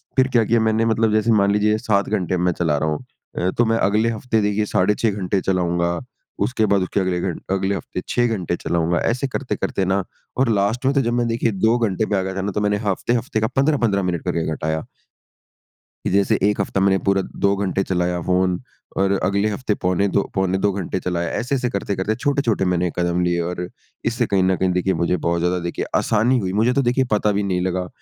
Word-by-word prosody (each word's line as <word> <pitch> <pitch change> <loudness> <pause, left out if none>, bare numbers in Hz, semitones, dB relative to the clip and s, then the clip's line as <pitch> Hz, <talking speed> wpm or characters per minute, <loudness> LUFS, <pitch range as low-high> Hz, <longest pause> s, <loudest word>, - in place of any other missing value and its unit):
फिर 130 -1 +4
क्या 120 -3 +3
किया 115 +2 +2
मैंने 110 0 +2
मतलब 110 -1 +2
जैसे 110 +2 +2
मान 100 -2 +4
लीजिए 105 +1 +2
7 105 -3 0
घंटे 95 -4 -1
अब - - -1
में 90 - 0
मैं 90 - +2
चला 80 -3 0
रहा 80 +2 0
हूँ। 75 - -3 0.3
अ, 90 +1 +1
तो 120 - +4
मैं 115 0 +2
अगले 110 +2 +2
हफ़्ते 110 0 -1
देखिए 105 +1 +1
साढ़े 105 +1 +2
6 110 -2 +1
घंटे 95 -1 -1
चलाऊँगा 85 -2 0 0.5
उसके 120 -4 0
बाद 100 -1 +2
उसके 90 +2 -1
अगले 90 -2 0
घंट 90 -4 -3
अगले 95 +1 0
हफ़्ते 90 0 -5
6 120 0 +2
घंटे 95 -7 -1
चलाऊँगा 85 0 0
ऐसे 125 +4 0
करते 130 -4 -3
करते 95 -1 -1
ना 95 +1 +1 0.3
और 130 -2 +2
लास्ट 110 +5 0
में 135 - +3
तो 140 - +4
जब 120 -2 -1
मैं 120 0 +1
देखिए 115 0 0
2 110 +4 +2
घंटे 110 -3 0
पे 105 - -1
आ 95 - +1
गया 95 0 -4
था 95 - -2
ना 100 +2 -2
तो 105 - -2
मैंने 105 0 +1
हफ़्ते-हफ़्ते 115 +3 0
का 110 - +2
15-15 130 -8 +2
मिनट 90 -2 -2
करके 85 -2 -1
घटाया। 80 0 -2 1.2
कि - - +1
जैसे 100 +2 +3
एक 105 0 +2
हफ्ता 95 - -2
मैंने 95 0 +4
पूरा 100 0 +3 0.2
2 100 - +3
घंटे 95 -1 -1
चलाया 90 -1 -1
फ़ोन 90 0 +1 0.4
और 95 0 +2
अगले 100 +2 +1
हफ़्ते 105 +1 -1
पौने 90 +2 +2
2 100 - +2
पौने 95 0 +1
2 100 +1 +1
घंटे 95 -1 -3
चलाया 85 -2 -2
ऐसे-ऐसे 125 0 -1
करते-करते 100 +1 -2
छोटे 140 +3 0
छोटे 110 -7 0
मैंने 90 -1 +1
कदम 85 0 +1
लिए 85 0 +1
और 90 0 -4 0.4
इससे 115 0 +1
कहीं 95 -2 +1
न 95 0 +3
कहीं 95 - +1
देखिए 90 +1 +1
मुझे 90 +1 +1
बहुत 85 0 +1
ज़्यादा 90 +1 +1
देखिए 85 - -3
आसानी 115 +4 +2
हुई। 95 -3 -3
मुझे 125 +2 +3
तो 140 - +2
देखिए 125 +1 +2
पता 105 0 +2
भी 100 0 0
नहीं 90 -2 0
लगा 90 0 -1
100 Hz, 230 wpm, -21 LUFS, 90-110 Hz, 1.2 s, फिर